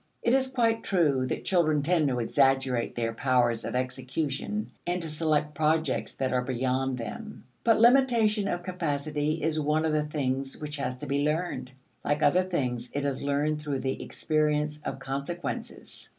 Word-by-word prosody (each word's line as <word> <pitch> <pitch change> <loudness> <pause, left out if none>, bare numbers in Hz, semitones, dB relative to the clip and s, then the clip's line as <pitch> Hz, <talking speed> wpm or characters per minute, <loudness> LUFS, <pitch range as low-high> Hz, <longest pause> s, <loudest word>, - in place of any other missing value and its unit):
It 235 - +3
is 265 0 +3
quite 230 -4 +1
true 145 -9 +2
that - - -3
children 155 -5 +2
tend 165 -1 +3
to 130 -2 0
exaggerate 135 0 +2
their 115 -1 -1
powers 120 -2 +2
of - - -3
execution 135 +9 -2 0.2
and 175 +1 0
to 165 - -4
select 150 -1 0
projects 155 -1 0
that 130 -1 -1
are 125 - +2
beyond 130 +1 -1
them. 215 - -7 0.2
But 225 -2 +4
limitation 230 -4 +4
of 175 -2 -2
capacity 155 -3 -2
is 155 0 +1
one 155 +1 +1
of 160 - +1
the 155 - +3
things 135 -3 -2
which 150 0 -5
has 130 -2 -3
to 145 - -7
be 140 +1 0
learned; 155 -3 -1 0.3
like 145 +1 0
other 180 - +5
things, 125 -9 -2
it 145 0 -1
is 140 -2 -1
learned 145 +2 0
through 145 -3 -2
the 130 0 -2
experience 150 -1 0
of - - -4
consequences. 140 +4 -5
150 Hz, 170 wpm, -28 LUFS, 135-170 Hz, 0.3 s, other